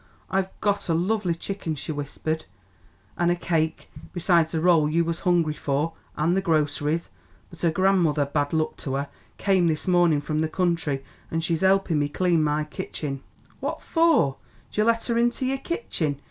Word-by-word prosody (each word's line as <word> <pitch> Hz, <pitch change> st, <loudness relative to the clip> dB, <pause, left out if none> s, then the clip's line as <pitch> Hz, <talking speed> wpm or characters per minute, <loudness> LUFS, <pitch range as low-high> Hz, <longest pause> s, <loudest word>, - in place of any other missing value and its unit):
"I've 190 Hz, 0 st, +1 dB
got 205 Hz, -3 st, 0 dB
a 165 Hz, -, +3 dB
lovely 185 Hz, 0 st, 0 dB
chicken," 170 Hz, -2 st, -4 dB
she 150 Hz, -, -5 dB
whispered, 155 Hz, +2 st, -3 dB, 0.7 s
"an' 175 Hz, 0 st, +3 dB
a 175 Hz, -, +3 dB
cake, 160 Hz, -2 st, -1 dB, 0.2 s
besides 170 Hz, -2 st, +2 dB
the 160 Hz, -, 0 dB
rolls 160 Hz, -3 st, +4 dB
you 170 Hz, 0 st, +3 dB
was 165 Hz, 0 st, -2 dB
hungry 175 Hz, -4 st, +2 dB
for, 150 Hz, +2 st, -1 dB, 0.2 s
an' 160 Hz, +3 st, +2 dB
the 195 Hz, -, +2 dB
groceries; 155 Hz, -1 st, 0 dB, 0.4 s
but 170 Hz, -, -11 dB
her 170 Hz, -, +3 dB
gran'mother, 170 Hz, -4 st, +2 dB
bad 145 Hz, 0 st, -1 dB
luck 160 Hz, -1 st, 0 dB
to 135 Hz, -2 st, -3 dB
her, 140 Hz, +1 st, -2 dB, 0.3 s
come 190 Hz, -3 st, +3 dB
this 155 Hz, +1 st, -1 dB
mornin' 175 Hz, -4 st, +4 dB
from 155 Hz, +1 st, -2 dB
the 160 Hz, -, 0 dB
country, 165 Hz, -6 st, 0 dB, 0.3 s
an' 165 Hz, -, -1 dB
she's 165 Hz, 0 st, -1 dB
helpin' 190 Hz, -4 st, +3 dB
me 145 Hz, 0 st, 0 dB
clean 170 Hz, 0 st, +2 dB
my 150 Hz, 0 st, +1 dB
kitchen." 145 Hz, -2 st, -5 dB, 0.4 s
"Phwat -, -, -2 dB
for 325 Hz, -, +3 dB, 0.3 s
'd -, -, -12 dB
you 210 Hz, -, +3 dB
let 230 Hz, 0 st, +2 dB
her 235 Hz, -1 st, +1 dB
into 240 Hz, +2 st, +1 dB
your 270 Hz, +1 st, 0 dB
kitchen?" 170 Hz, -, -2 dB
165 Hz, 180 wpm, -25 LUFS, 150-185 Hz, 0.7 s, rolls